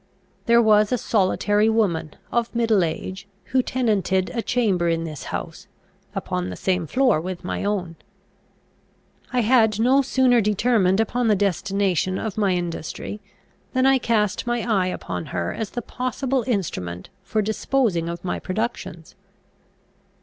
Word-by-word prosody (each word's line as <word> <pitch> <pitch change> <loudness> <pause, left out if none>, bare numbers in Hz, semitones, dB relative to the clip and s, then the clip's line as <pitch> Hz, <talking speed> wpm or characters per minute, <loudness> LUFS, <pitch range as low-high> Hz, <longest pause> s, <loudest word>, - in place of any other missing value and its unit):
There 235 0 +6
was 210 -1 +4
a 250 - +2
solitary 205 0 +2
woman, 190 -9 0 0.2
of 235 0 -1
middle 225 -5 +3
age, 185 +4 -4 0.2
who 260 - +4
tenanted 205 -7 0
a 235 - -1
chamber 200 -9 +1
in 165 0 0
this 155 -4 -7
house, - - -6 0.5
upon 90 0 -2
the 90 - -5
same 180 - -1
floor 250 - +2
with 180 +1 -6
my - - -3
own. 185 -5 -2 1.3
I 250 - +2
had 220 -2 +3
no 260 +4 +4
sooner 255 -2 +3
determined 210 -2 +2
upon 240 +2 +1
the 215 - +4
destination 195 -1 0
of 220 -4 -4
my 200 -3 +2
industry 175 +4 -5 0.5
than 260 0 +2
I 270 0 +5
cast 215 -3 0
my 240 -1 0
eye 195 -5 +2
upon 90 - -4
her 85 -1 -2
as 220 -3 -4
the 240 - -5
possible 255 +2 -2
instrument 90 - -3
for 215 -1 -1
disposing 215 -5 0
of 170 +1 -6
my - - -2
productions. 185 -5 -4
210 Hz, 145 wpm, -23 LUFS, 180-235 Hz, 1.3 s, There